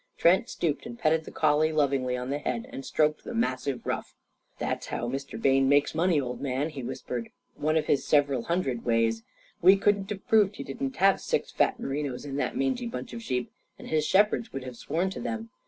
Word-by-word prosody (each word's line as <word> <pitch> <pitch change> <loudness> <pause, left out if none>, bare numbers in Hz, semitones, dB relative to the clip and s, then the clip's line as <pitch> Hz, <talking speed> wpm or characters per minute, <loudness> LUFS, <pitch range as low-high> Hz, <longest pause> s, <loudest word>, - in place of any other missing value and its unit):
Trent 180 +3 +4
stooped 160 +6 -2
and 235 0 -8
petted 160 -5 +2
the - - -9
collie 155 0 +2
lovingly 135 -4 +1
on 125 +2 -4
the 145 - -1
head 235 +10 -3
and 270 0 -6
stroked 155 - +1
the 240 - -6
massive 135 - -1
ruff. - - -3 0.4
"That's - - -3
how 120 - -3
Mr. 135 -1 -5
Bayne 135 +2 +3
makes 145 +1 +3
money, 165 -1 +2
old 125 -2 -4
man," 140 +2 -1
he 140 -3 -6
whispered. 125 -1 -5 0.2
"One 155 +2 0
of 155 - +1
his 140 - +2
several 140 -5 +2
hundred 140 -9 -1
ways. 115 -1 +1 0.4
We 185 +3 +8
couldn't 200 0 +1
have 205 -2 -6
proved 210 -2 +4
he - - -6
didn't 135 -1 -4
have 195 +1 +4
six - - -1
fat - - +1
merinos 135 -1 -3
in 140 -1 -4
that 220 - -1
mangy 260 -2 0
bunch 235 +1 -6
of 235 - -6
sheep. 125 - -2 0.3
And - - -10
his 155 -1 +2
shepherds 210 +7 +2
would 135 - -5
have 130 -1 -7
sworn 170 +10 -1
to - - -6
them. 230 -1 -4
150 Hz, 210 wpm, -28 LUFS, 135-195 Hz, 0.4 s, We